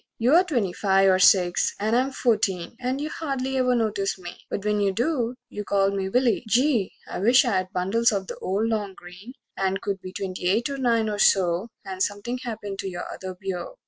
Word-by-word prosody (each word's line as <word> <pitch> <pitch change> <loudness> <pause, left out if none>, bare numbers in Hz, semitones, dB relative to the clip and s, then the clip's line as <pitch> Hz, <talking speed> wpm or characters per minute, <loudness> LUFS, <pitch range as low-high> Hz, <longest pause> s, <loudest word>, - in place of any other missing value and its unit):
You're 280 +10 +5
twenty 240 - -1
five 195 -1 +3
or 185 - +3
six, 180 -2 +4
and 215 +3 +1
I'm 255 +2 +2
fourteen, 210 -7 0
And 255 +2 -2
you 300 +1 -3
don't - - -8
hardly 270 -4 -2
ever 250 -1 +2
notice 210 -4 -1
me 175 -1 -9
But 200 - -4
when 210 0 +1
you 200 -1 +2
do, 245 - -1
you 210 - -6
call 195 -1 +2
me 195 -1 -2
Willie! 245 +1 +2
Gee, 240 -3 +2 0.2
I - - -5
wisht 240 +7 +5
I'd 185 -5 0
bundles 210 +7 +2
of 195 -2 -2
the - - -7
old 200 +4 -1
long 210 -4 -2
green 180 +7 -12 0.2
And 195 0 -1
could 195 -1 -4
be 185 - -8
twenty 185 -1 -4
eight 230 +8 +1
or 275 - -4
nine 230 -3 +2
or 210 -1 -3
so, 185 +1 +3 0.2
And 190 -1 -6
something 205 +6 -2
happened 205 -5 -6
to 195 -2 -3
your 175 -1 -6
other 185 -1 -7
beau. 185 -2 -5
205 Hz, 210 wpm, -25 LUFS, 190-240 Hz, 0.2 s, You're